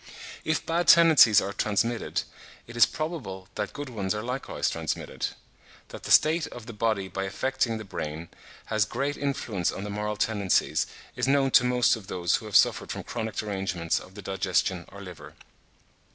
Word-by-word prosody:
If 155 - -1
bad 170 +1 0
tendencies 160 - +7
are 100 - -4
transmitted, 115 +3 -1 0.4
it 120 - -11
is 120 - +6
probable 125 - -5
that 105 - -3
good 145 0 -6
ones 105 -4 -2
are 105 - -4
likewise 125 +3 -3
transmitted. - - -3 0.6
That - - -10
the - - -6
state 160 +2 +5
of 120 -3 -10
the 115 - -8
body 105 -3 0
by 95 +1 -4
affecting 115 +3 -1
the 110 - -7
brain, 80 -4 -6 0.4
has 110 -1 +1
great 140 +9 -2
influence 120 -11 -2
on 95 - -6
the 105 - -5
moral 105 +1 -2
tendencies 105 -3 +1 0.3
is - - -1
known 135 -1 +3
to 125 - +6
most 125 -1 +3
of 105 -4 -11
those 85 -2 0
who - - -10
have - - -6
suffered - - +4
from - - -5
chronic 110 -2 -4
derangements 95 -5 -2
of 95 - -14
the 100 - -9
digestion 95 -1 0
or 100 0 -10
liver. 75 -5 -11
110 Hz, 180 wpm, -27 LUFS, 95-125 Hz, 0.6 s, tendencies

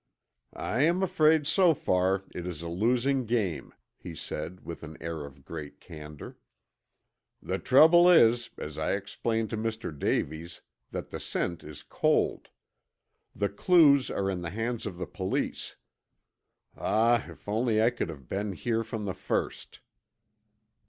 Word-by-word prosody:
"I 120 +5 -1
am 170 +5 +3
afraid 160 -5 +3
so 170 +1 +4
far 95 -3 +1
it 90 0 -5
is 85 -2 -5
a - - -5
losing 120 +8 +1
game," 100 - -1 0.3
he 85 - -8
said 90 +3 -6
with 85 - -7
an 80 -1 -9
air 80 -3 -5
of 70 -1 -17
great 75 -3 -8
candor. 75 -1 -10 1.0
"The - - -3
trouble 170 +6 +7
is, 120 -8 +5
as 75 0 -6
I 80 - 0
explained 110 +2 -2
to 110 - -2
Mr. 110 -6 -3
Davies, 80 +4 -2 0.3
that - - -6
the - - -5
scent 85 -2 -3
is 75 -1 -10
cold. - - 0 0.9
The 100 0 0
clues 140 - +5
are 100 - -1
in 95 -2 -2
the 85 - -4
hands 115 +3 -3
of 90 -4 -6
the 90 - -3
police. 95 +1 -3 1.0
Ah, 115 +1 +2
if - - -14
only 110 +1 +1
I 115 +2 +4
could 120 - -3
have 70 -6 -9
been 100 +1 -2
here 115 +3 -1
from 110 -2 -5
the 95 - -2
first!" - - -3
105 Hz, 150 wpm, -28 LUFS, 85-120 Hz, 1.0 s, trouble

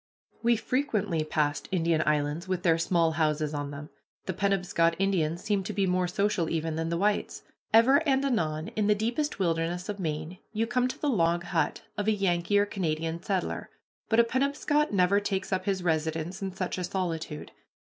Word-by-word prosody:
We 235 0 +4
frequently 215 - 0
passed 150 -1 -1
Indian 165 -3 +2
islands 150 +3 0
with 185 -1 -2
their 165 -2 +3
small 165 -1 +2
houses 155 -1 0
on 145 -1 -3
them. 145 +1 -8 0.3
The 185 - -2
Penobscot 180 -3 +1
Indians 175 -3 0
seem 205 -2 +1
to 210 - -3
be 200 0 +1
more 180 -1 +1
social 200 -3 0
even 160 -1 -1
than 165 +1 -2
the 170 - 0
whites. 205 +3 0 0.3
Ever 235 +5 +6
and 270 0 +2
anon 160 - -1
in 210 -1 -1
the 210 - +4
deepest 235 +8 -1
wilderness 175 0 -1
of 205 -1 -4
Maine 155 +1 -4
you 225 +1 +1
come 250 +2 +1
to 255 - -5
the 300 - -1
log 175 -8 +2
hut 175 -2 -1 0.2
of 205 - -1
a - - +5
Yankee 190 -1 +1
or 205 - +4
Canada 165 -4 -2
settler, 190 0 -2 0.4
but 225 - +4
a - - +8
Penobscot 280 +4 +1
never 195 0 +3
takes 195 -2 -2
up 185 - -1
his 195 -3 -1
residence 160 +3 -1
in 195 -1 -2
such 185 0 -3
a - - -2
solitude. 165 -4 -3
180 Hz, 185 wpm, -28 LUFS, 165-205 Hz, 0.4 s, a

